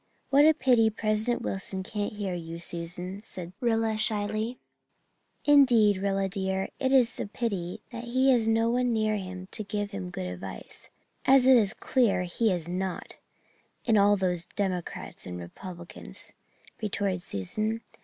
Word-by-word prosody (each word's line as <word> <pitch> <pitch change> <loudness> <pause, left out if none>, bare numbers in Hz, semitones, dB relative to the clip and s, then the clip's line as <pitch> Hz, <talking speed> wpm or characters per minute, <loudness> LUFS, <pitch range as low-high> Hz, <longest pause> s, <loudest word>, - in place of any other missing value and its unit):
"What 285 +2 +7
a 315 - +6
pity 240 -5 +4
President 215 +2 0
Wilson 190 0 -3
can't 205 +1 -3
hear 205 -3 -3
you, 165 -1 -5
Susan," 175 +3 -5
said 180 -4 -8
Rilla 225 -2 +1
slyly. 215 +2 -1 0.9
"Indeed, 245 -9 +6
Rilla 195 0 0
dear, 190 0 -2
it 260 -1 +1
is 250 -3 +4
a - - -2
pity 200 -6 -3
that 235 0 -6
he 260 +3 +3
has 235 -3 +3
no 225 0 +3
one 245 0 +1
near 215 -1 +1
him 185 -1 -7
to 215 - -4
give 205 0 -3
him 195 -3 -5
good 135 - -5
advice, 90 +1 -7 0.4
as 265 -1 +6
it 260 0 +8
is 215 -5 +4
clear 235 -8 +2
he 200 +6 0
has 175 -4 -1
not, 180 0 -4 0.7
in 225 - +3
all 205 0 +5
those 180 -3 0
Democrats 185 -4 -3
and 90 0 -5
Republicans," 175 - -9 0.5
retorted 200 -3 -1
Susan. 215 - -2
205 Hz, 155 wpm, -28 LUFS, 185-230 Hz, 0.9 s, it